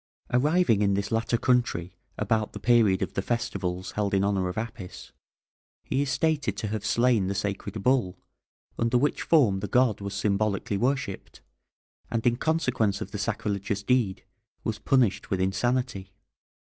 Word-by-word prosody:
Arriving 145 Hz, -, +3 dB
in 100 Hz, -1 st, +2 dB
this 100 Hz, +1 st, -2 dB
latter 115 Hz, +1 st, +1 dB
country 115 Hz, -9 st, 0 dB, 0.2 s
about 110 Hz, 0 st, 0 dB
the -, -, -6 dB
period 110 Hz, -6 st, +3 dB
of 90 Hz, -, -5 dB
the -, -, -1 dB
festivals 95 Hz, -6 st, -3 dB
held 100 Hz, -1 st, -1 dB
in 95 Hz, -, +2 dB
honour 95 Hz, -2 st, +1 dB
of 90 Hz, -, -6 dB
Apis, 110 Hz, -5 st, -6 dB, 0.7 s
he 135 Hz, -, -1 dB
is 140 Hz, -, -1 dB
stated 140 Hz, -6 st, 0 dB
to 105 Hz, -, -3 dB
have 110 Hz, -1 st, -3 dB
slain 120 Hz, -5 st, +2 dB
the 100 Hz, -, -2 dB
sacred 100 Hz, +1 st, -3 dB
bull, 120 Hz, -9 st, +2 dB, 0.6 s
under 115 Hz, +1 st, +2 dB
which 145 Hz, +4 st, +1 dB
form 120 Hz, -13 st, +3 dB
the 105 Hz, -, -4 dB
god 125 Hz, -4 st, +2 dB
was 100 Hz, 0 st, -5 dB
symbolically 100 Hz, 0 st, 0 dB
worshipped, 125 Hz, -3 st, -2 dB, 0.7 s
and 115 Hz, 0 st, -2 dB
in 120 Hz, -1 st, +4 dB
consequence 125 Hz, -9 st, 0 dB
of -, -, -6 dB
the 105 Hz, -, -5 dB
sacrilegious 100 Hz, -2 st, -2 dB
deed, 120 Hz, -5 st, +1 dB, 0.4 s
was 110 Hz, -2 st, -3 dB
punished 125 Hz, -4 st, +1 dB
with 95 Hz, -, 0 dB
insanity. 95 Hz, +1 st, -1 dB
110 Hz, 155 wpm, -27 LUFS, 100-125 Hz, 0.7 s, in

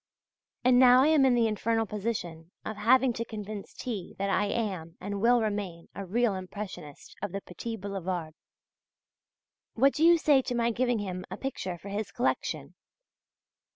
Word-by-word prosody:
And 250 Hz, 0 st, +5 dB
now 255 Hz, 0 st, +7 dB
I 300 Hz, -, +4 dB
am 305 Hz, -4 st, +5 dB
in 255 Hz, -2 st, +4 dB
the 235 Hz, -1 st, +3 dB
infernal 225 Hz, +1 st, 0 dB
position 190 Hz, -6 st, -4 dB, 0.2 s
of 220 Hz, -, -4 dB
having 245 Hz, +4 st, +4 dB
to 230 Hz, -, -3 dB
convince 210 Hz, -3 st, -7 dB
T. 210 Hz, -8 st, -5 dB
that 200 Hz, 0 st, -1 dB
I 205 Hz, -, +2 dB
am 190 Hz, -7 st, -3 dB
and 200 Hz, +1 st, -4 dB
will 240 Hz, +1 st, +4 dB
remain 200 Hz, -6 st, -4 dB
a 200 Hz, -, -6 dB
real 230 Hz, +2 st, +2 dB
Impressionist 185 Hz, -5 st, -8 dB
of 205 Hz, -2 st, -3 dB
the 200 Hz, -, -4 dB
petit 225 Hz, +6 st, -6 dB
boulevard. 185 Hz, -5 st, -4 dB, 1.4 s
What 270 Hz, +4 st, +4 dB
do 310 Hz, -, 0 dB
you 340 Hz, +1 st, +7 dB
say 290 Hz, -4 st, +4 dB
to 245 Hz, -, -3 dB
my 235 Hz, 0 st, +2 dB
giving 245 Hz, +1 st, +1 dB
him 185 Hz, -3 st, -4 dB
a -, -, -6 dB
picture 190 Hz, -9 st, -4 dB
for 200 Hz, -, -10 dB
his 205 Hz, +1 st, -3 dB
collection? 245 Hz, -, -2 dB
215 Hz, 170 wpm, -29 LUFS, 190-245 Hz, 1.4 s, now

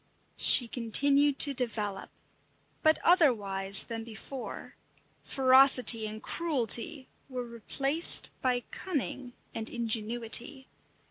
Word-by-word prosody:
She 245 Hz, -, +6 dB
continued 275 Hz, +5 st, -1 dB
to 285 Hz, -, +6 dB
develop, 215 Hz, -6 st, -6 dB, 0.7 s
but 315 Hz, 0 st, +2 dB
otherwise 200 Hz, -, +1 dB
than 225 Hz, -1 st, -8 dB
before; 235 Hz, +3 st, -10 dB, 0.5 s
ferocity 260 Hz, -4 st, +3 dB
and 215 Hz, +1 st, -10 dB
cruelty 280 Hz, -2 st, -1 dB, 0.2 s
were 250 Hz, -2 st, -7 dB
replaced 270 Hz, +7 st, +1 dB
by 250 Hz, -1 st, -2 dB
cunning 270 Hz, -7 st, -7 dB, 0.2 s
and 225 Hz, 0 st, -6 dB
ingenuity. 235 Hz, +3 st, -1 dB
245 Hz, 90 wpm, -27 LUFS, 225-275 Hz, 0.7 s, She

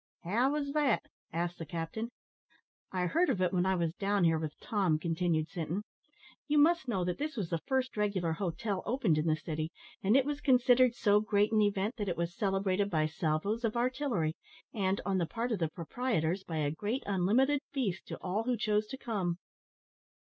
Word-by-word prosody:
"How 235 Hz, +10 st, +2 dB
was 285 Hz, -2 st, -1 dB
that?" 290 Hz, -6 st, +2 dB, 0.3 s
asked 170 Hz, +2 st, -2 dB
the 165 Hz, -, -4 dB
captain. 175 Hz, +7 st, -4 dB, 0.8 s
"I 180 Hz, -1 st, 0 dB
heard 335 Hz, -, +2 dB
of 235 Hz, -8 st, +1 dB
it 185 Hz, -1 st, +1 dB
when 180 Hz, 0 st, +2 dB
I 190 Hz, -, +3 dB
was 170 Hz, -2 st, 0 dB
down 200 Hz, +1 st, 0 dB
here 165 Hz, -1 st, +4 dB
with 155 Hz, -2 st, -5 dB
Tom," 190 Hz, -8 st, +1 dB
continued 165 Hz, -1 st, 0 dB
Sinton. 175 Hz, +2 st, -3 dB, 0.6 s
"You 300 Hz, 0 st, +2 dB
must 320 Hz, 0 st, +4 dB
know 190 Hz, -7 st, 0 dB
that 180 Hz, -1 st, -2 dB
this 300 Hz, -2 st, -3 dB
was 185 Hz, -6 st, -3 dB
the 165 Hz, -2 st, -1 dB
first 260 Hz, -1 st, 0 dB
regular 200 Hz, -6 st, 0 dB
hotel 185 Hz, +3 st, -2 dB
opened 225 Hz, -, +2 dB
in 155 Hz, -, 0 dB
the 155 Hz, -, +3 dB
city, 155 Hz, 0 st, -4 dB, 0.3 s
and 210 Hz, +6 st, +4 dB
it 270 Hz, -, +3 dB
was 290 Hz, 0 st, -3 dB
considered 250 Hz, -2 st, +5 dB
so 205 Hz, -3 st, +4 dB
great 210 Hz, 0 st, +2 dB
an 215 Hz, -1 st, +4 dB
event 205 Hz, +3 st, +1 dB
that 205 Hz, -3 st, -2 dB
it 170 Hz, -, -2 dB
was 170 Hz, 0 st, -2 dB
celebrated 195 Hz, -1 st, +1 dB
by 155 Hz, -4 st, +2 dB
salvos 160 Hz, +8 st, -1 dB
of 230 Hz, 0 st, 0 dB
artillery, 245 Hz, -, 0 dB, 0.4 s
and, 195 Hz, -3 st, 0 dB
on 195 Hz, -2 st, +1 dB
the 170 Hz, -, 0 dB
part 235 Hz, +6 st, -3 dB
of 215 Hz, -, 0 dB
the 165 Hz, -2 st, 0 dB
proprietors, 180 Hz, 0 st, -1 dB
by 165 Hz, -3 st, -4 dB
a 145 Hz, -2 st, +1 dB
great 210 Hz, -, -2 dB
unlimited 225 Hz, +9 st, +2 dB
feast 210 Hz, -10 st, -2 dB
to -, -, -5 dB
all 200 Hz, +5 st, -1 dB
who 250 Hz, -1 st, +1 dB
chose 210 Hz, 0 st, +1 dB
to 265 Hz, -, -6 dB
come." 195 Hz, -9 st, -2 dB
200 Hz, 200 wpm, -32 LUFS, 170-240 Hz, 0.8 s, considered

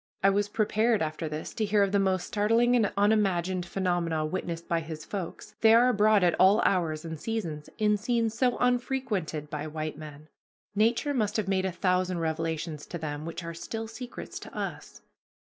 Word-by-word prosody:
I 195 Hz, -, +6 dB
was 205 Hz, +1 st, 0 dB
prepared 215 Hz, -1 st, +2 dB
after 155 Hz, +1 st, -3 dB
this 155 Hz, +1 st, -5 dB
to 220 Hz, -, -1 dB
hear 205 Hz, -1 st, +3 dB
of 195 Hz, -, 0 dB
the 200 Hz, -, +3 dB
most 190 Hz, -2 st, +1 dB
startling 230 Hz, +4 st, +2 dB
and 220 Hz, -5 st, +2 dB
unimagined 190 Hz, -4 st, +2 dB
phenomena 175 Hz, -4 st, 0 dB
witnessed 170 Hz, 0 st, -4 dB
by 170 Hz, -, +1 dB
"his 160 Hz, -1 st, -7 dB
folks," 200 Hz, +2 st, -6 dB
they 225 Hz, 0 st, +7 dB
are 245 Hz, +2 st, +6 dB
abroad 215 Hz, -3 st, +4 dB
at 175 Hz, -2 st, +4 dB
all 195 Hz, +4 st, +6 dB
hours 165 Hz, -4 st, +1 dB
and 160 Hz, -2 st, -6 dB
seasons 165 Hz, -8 st, -4 dB
in 210 Hz, -1 st, +3 dB
scenes 230 Hz, +1 st, 0 dB
so 250 Hz, 0 st, +2 dB
unfrequented 245 Hz, -, -1 dB
by 150 Hz, 0 st, -4 dB
white 155 Hz, 0 st, -5 dB
men. 150 Hz, -1 st, -10 dB, 0.5 s
Nature 230 Hz, +7 st, +2 dB
must 215 Hz, -4 st, 0 dB
have 210 Hz, -3 st, -1 dB
made 190 Hz, -1 st, +1 dB
a 190 Hz, -, 0 dB
thousand 180 Hz, 0 st, 0 dB
revelations 160 Hz, -1 st, -3 dB
to 175 Hz, -, -5 dB
them 150 Hz, -2 st, -5 dB
which 165 Hz, +1 st, -5 dB
are 170 Hz, 0 st, -5 dB
still 225 Hz, +7 st, -5 dB
secrets 245 Hz, +2 st, -8 dB
to -, -, -11 dB
us. -, -, -6 dB
190 Hz, 185 wpm, -28 LUFS, 165-215 Hz, 0.5 s, they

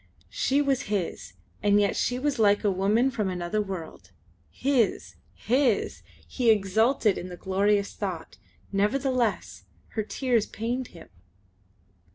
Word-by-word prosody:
She 280 Hz, +2 st, +1 dB
was 275 Hz, -3 st, +1 dB
his, 200 Hz, -5 st, -3 dB, 0.3 s
and 205 Hz, 0 st, +4 dB
yet 200 Hz, -1 st, +1 dB
she 245 Hz, -, 0 dB
was 275 Hz, -1 st, -1 dB
like 205 Hz, -1 st, +4 dB
a 205 Hz, -, +3 dB
woman 210 Hz, +8 st, +2 dB
from 210 Hz, -6 st, -1 dB
another 180 Hz, +3 st, -2 dB
world. 180 Hz, -, -7 dB, 0.4 s
His! 245 Hz, -, 0 dB, 0.2 s
His! 250 Hz, -2 st, +1 dB, 0.3 s
He 245 Hz, -3 st, 0 dB
exulted 220 Hz, +2 st, +3 dB
in 180 Hz, -, -7 dB
the 180 Hz, -, -8 dB
glorious 200 Hz, +2 st, +1 dB
thought; 185 Hz, -5 st, -5 dB, 0.3 s
nevertheless 240 Hz, +3 st, 0 dB, 0.2 s
her 220 Hz, -, -2 dB
tears 235 Hz, 0 st, 0 dB
pained 240 Hz, +3 st, -3 dB
him. 165 Hz, -2 st, -14 dB
210 Hz, 130 wpm, -26 LUFS, 195-250 Hz, 0.4 s, and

